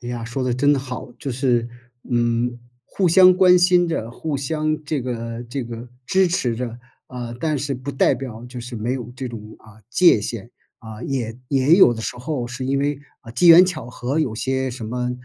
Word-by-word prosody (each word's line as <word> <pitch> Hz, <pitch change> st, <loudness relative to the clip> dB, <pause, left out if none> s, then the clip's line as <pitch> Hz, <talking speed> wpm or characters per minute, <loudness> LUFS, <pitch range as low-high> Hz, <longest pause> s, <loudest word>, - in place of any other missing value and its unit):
哎 120 Hz, -, -6 dB
呀， 120 Hz, -2 st, -4 dB
说 130 Hz, +3 st, -4 dB
得 125 Hz, -1 st, 0 dB
真 145 Hz, +3 st, +3 dB
好。 130 Hz, -2 st, -6 dB
就 135 Hz, -, -5 dB
是， 120 Hz, -2 st, 0 dB, 0.4 s
嗯， 120 Hz, 0 st, 0 dB, 0.3 s
互 190 Hz, -3 st, 0 dB
相 185 Hz, +1 st, +7 dB
关 180 Hz, -1 st, +6 dB
心 175 Hz, -1 st, +4 dB
着， 115 Hz, -8 st, -3 dB
互 150 Hz, +3 st, -4 dB
相 155 Hz, +3 st, -2 dB
这 150 Hz, -2 st, -2 dB
个 115 Hz, -1 st, -5 dB
这 125 Hz, +2 st, -4 dB
个 120 Hz, +1 st, -8 dB, 0.2 s
支 190 Hz, 0 st, +3 dB
持 150 Hz, -9 st, 0 dB
着， 120 Hz, -1 st, -5 dB, 0.3 s
啊， 120 Hz, -2 st, -7 dB
但 155 Hz, 0 st, -1 dB
是 140 Hz, +1 st, -2 dB
不 130 Hz, +3 st, -6 dB
代 135 Hz, -, +2 dB
表 120 Hz, -3 st, -7 dB
就 125 Hz, 0 st, -8 dB
是 120 Hz, 0 st, -7 dB
没 115 Hz, +4 st, -2 dB
有 120 Hz, -2 st, -5 dB
这 130 Hz, -1 st, -4 dB
种， 115 Hz, -2 st, -7 dB, 0.2 s
啊， 110 Hz, 0 st, -18 dB
界 170 Hz, -, +5 dB
限， 115 Hz, +1 st, -6 dB, 0.3 s
啊， 110 Hz, -2 st, -10 dB
也 120 Hz, -4 st, -3 dB
也 140 Hz, +3 st, +4 dB
有 180 Hz, -10 st, +7 dB
的 115 Hz, -, -6 dB
时 125 Hz, -, -4 dB
候 125 Hz, -1 st, -4 dB
是 120 Hz, +2 st, -6 dB
因 135 Hz, +1 st, 0 dB
为， 145 Hz, 0 st, -1 dB, 0.2 s
啊， 115 Hz, -, -12 dB
机 170 Hz, +9 st, +3 dB
缘 170 Hz, +2 st, +10 dB
巧 160 Hz, -10 st, -4 dB
合， 125 Hz, +4 st, -3 dB
有 130 Hz, -9 st, 0 dB
些 130 Hz, +2 st, -1 dB
什 120 Hz, -2 st, -7 dB
么， 125 Hz, +2 st, -2 dB
125 Hz, 225 characters per minute, -21 LUFS, 120-145 Hz, 0.4 s, 缘